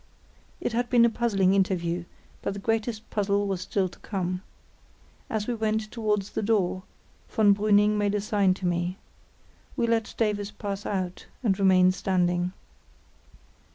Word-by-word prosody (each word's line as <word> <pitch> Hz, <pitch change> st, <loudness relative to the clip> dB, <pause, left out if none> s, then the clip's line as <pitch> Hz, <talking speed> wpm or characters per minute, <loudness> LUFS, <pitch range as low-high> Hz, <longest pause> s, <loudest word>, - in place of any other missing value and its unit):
It -, -, -2 dB
had 240 Hz, +1 st, 0 dB
been 240 Hz, -2 st, +6 dB
a 235 Hz, -, +3 dB
puzzling 200 Hz, -5 st, +2 dB
interview, 175 Hz, -3 st, 0 dB, 0.4 s
but 200 Hz, -, -3 dB
the -, -, -5 dB
greatest 225 Hz, +1 st, -2 dB
puzzle 200 Hz, -1 st, +1 dB
was 190 Hz, -2 st, -2 dB
still 190 Hz, 0 st, 0 dB
to -, -, -14 dB
come. 185 Hz, -2 st, -3 dB, 0.9 s
As 215 Hz, -2 st, -1 dB
we 245 Hz, -, -1 dB
went 220 Hz, -1 st, -1 dB
towards 210 Hz, -3 st, -1 dB
the -, -, -2 dB
door, 200 Hz, -4 st, +1 dB, 0.5 s
von 205 Hz, -2 st, +4 dB
Brüning 210 Hz, +1 st, +3 dB
made 205 Hz, 0 st, +1 dB
a 205 Hz, -, 0 dB
sign 200 Hz, -3 st, +2 dB
to 185 Hz, -, -6 dB
me. 175 Hz, +1 st, -1 dB, 0.8 s
We -, -, +2 dB
let 230 Hz, -1 st, 0 dB
Davies 205 Hz, -2 st, 0 dB
pass 200 Hz, -1 st, -5 dB
out 185 Hz, -3 st, -3 dB, 0.2 s
and 200 Hz, -4 st, +1 dB
remained 185 Hz, -1 st, +5 dB
standing. 180 Hz, -1 st, 0 dB
200 Hz, 155 wpm, -27 LUFS, 185-215 Hz, 0.9 s, been